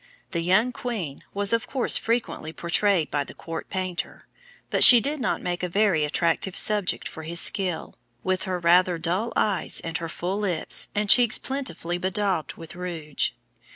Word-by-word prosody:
The 170 - -2
young 190 +8 +2
queen 210 - -6
was 200 +1 -1
of 230 +1 -1
course 265 -2 +3
frequently 230 -8 -2
portrayed 170 +1 0
by 145 -1 -1
the - - -13
court 165 -1 -8
painter, 185 -2 -5 0.5
but - - +6
she 245 - +12
did 290 +6 -2
not 240 - -2
make 175 -1 -3
a 180 - -3
very 195 -4 +1
attractive 170 +5 -1
subject 205 -8 0
for 160 - -10
his 170 +2 -1
skill, 185 -3 -1 0.3
with 185 +1 -2
her 185 -2 -3
rather 175 +1 +3
dull 185 +8 -2
eyes 195 -6 0
and 165 0 -5
her 165 -1 -6
full 185 +5 -4
lips, 185 -6 0
and 210 0 -1
cheeks 240 +1 +5
plentifully 175 - -5
bedaubed 185 -4 -2
with 165 -1 -11
rouge. 170 -5 -3
180 Hz, 170 wpm, -24 LUFS, 165-210 Hz, 0.5 s, she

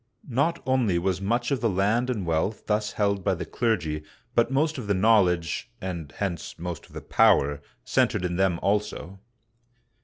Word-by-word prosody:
Not 160 +7 +1
only 125 -9 +2
was 90 +1 -1
much 120 +6 0
of 135 - 0
the 115 - +2
land 105 +6 +1
and 105 -7 -2
wealth 85 +6 -1
thus 105 0 0
held 100 -2 0
by - - +1
the 85 0 -5
clergy, 85 -12 -1 0.3
but 115 - +3
most 150 +2 +1
of 115 - -6
the 100 - +2
knowledge 95 -2 +2
— - - -40
and 85 -7 -5
hence 95 -5 -4
most 85 0 -6
of - - -21
the - - -7
power 70 +1 +3
— - - -41
centered 90 - +2
in 90 -1 -2
them 95 -2 +2
also. 100 -2 -1
100 Hz, 185 wpm, -26 LUFS, 90-115 Hz, 0.3 s, but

